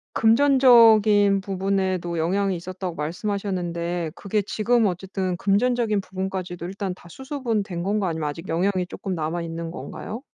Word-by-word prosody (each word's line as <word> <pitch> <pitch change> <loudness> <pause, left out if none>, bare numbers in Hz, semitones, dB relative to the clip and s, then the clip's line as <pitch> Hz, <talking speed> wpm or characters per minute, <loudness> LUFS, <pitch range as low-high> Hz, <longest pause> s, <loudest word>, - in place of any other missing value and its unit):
금전적인 225 -5 +5
부분에도 190 -3 -1
영향이 190 +3 +1
있었다고 185 0 -5
말씀하셨는데 175 -1 -3
그게 205 0 -1
지금 225 +3 +1
어쨌든 185 0 -2
금전적인 215 +1 +1
부분까지도 185 -2 -5
일단 190 0 -4
다 175 -1 -16
수습은 255 - -3
된 175 -4 -5
건가 200 +1 0
아니면 160 -2 -2
아직 165 +5 -8
영향이 180 +2 0
쪼끔 190 0 -5
남아 160 +2 -2
있는 165 0 -5
건가요? 225 +7 -7
190 Hz, 365 characters per minute, -24 LUFS, 175-210 Hz, -, 금전적인